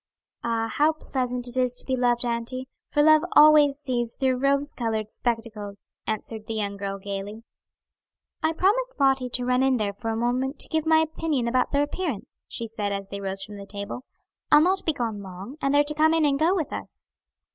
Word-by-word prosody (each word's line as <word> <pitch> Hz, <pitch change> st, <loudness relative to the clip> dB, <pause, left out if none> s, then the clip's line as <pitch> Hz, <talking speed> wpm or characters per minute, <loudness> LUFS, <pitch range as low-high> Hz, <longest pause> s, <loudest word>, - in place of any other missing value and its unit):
"Ah, 230 Hz, -1 st, 0 dB
how 300 Hz, +7 st, +2 dB
pleasant 250 Hz, -5 st, -3 dB
it 245 Hz, -, -1 dB
is 250 Hz, -1 st, +1 dB
to -, -, -3 dB
be 260 Hz, -, 0 dB
loved, 245 Hz, -1 st, +1 dB
auntie, 240 Hz, +2 st, -2 dB, 0.2 s
for 295 Hz, -, +2 dB
love 310 Hz, 0 st, +6 dB
always 300 Hz, -2 st, +7 dB
sees 245 Hz, -5 st, -2 dB
through 260 Hz, -2 st, +1 dB
rose 280 Hz, +2 st, +1 dB
colored 220 Hz, -3 st, -2 dB
spectacles," 220 Hz, -4 st, -2 dB, 0.2 s
answered 220 Hz, 0 st, -4 dB
the 225 Hz, -, -3 dB
young 200 Hz, -2 st, -2 dB
girl 195 Hz, 0 st, -4 dB
gayly. 200 Hz, +2 st, -6 dB, 1.0 s
"I 315 Hz, +1 st, +1 dB
promised 475 Hz, +8 st, +1 dB
Lottie 270 Hz, -2 st, +2 dB
to 245 Hz, 0 st, -2 dB
run 250 Hz, +1 st, +2 dB
in 265 Hz, -1 st, +3 dB
there 205 Hz, -2 st, -1 dB
for 225 Hz, +3 st, -5 dB
a 225 Hz, -, -1 dB
moment 255 Hz, +4 st, -1 dB
to -, -, -2 dB
give 320 Hz, -1 st, -1 dB
my 320 Hz, 0 st, +6 dB
opinion 315 Hz, -5 st, -1 dB
about 250 Hz, +1 st, +1 dB
their 285 Hz, 0 st, +2 dB
appearance," 290 Hz, -, -5 dB
she 230 Hz, -, -4 dB
said, 215 Hz, -2 st, -3 dB
as 195 Hz, -1 st, -4 dB
they 200 Hz, 0 st, -6 dB
rose 195 Hz, 0 st, -3 dB
from 205 Hz, +1 st, -9 dB
the 200 Hz, 0 st, -9 dB
table. 200 Hz, +5 st, -6 dB, 0.5 s
"I'll 295 Hz, -, +8 dB
not 370 Hz, +3 st, +1 dB
be 320 Hz, -, +3 dB
gone 225 Hz, -6 st, -3 dB
long; 195 Hz, +8 st, -9 dB
and 275 Hz, -, +1 dB
they're 290 Hz, +1 st, +5 dB
to 295 Hz, +1 st, -2 dB
come 315 Hz, +2 st, +3 dB
in 320 Hz, -2 st, +3 dB
and 280 Hz, -1 st, +2 dB
go 335 Hz, +5 st, +3 dB
with 315 Hz, -6 st, -2 dB
us." -, -, -9 dB
250 Hz, 210 wpm, -25 LUFS, 220-290 Hz, 1.0 s, I'll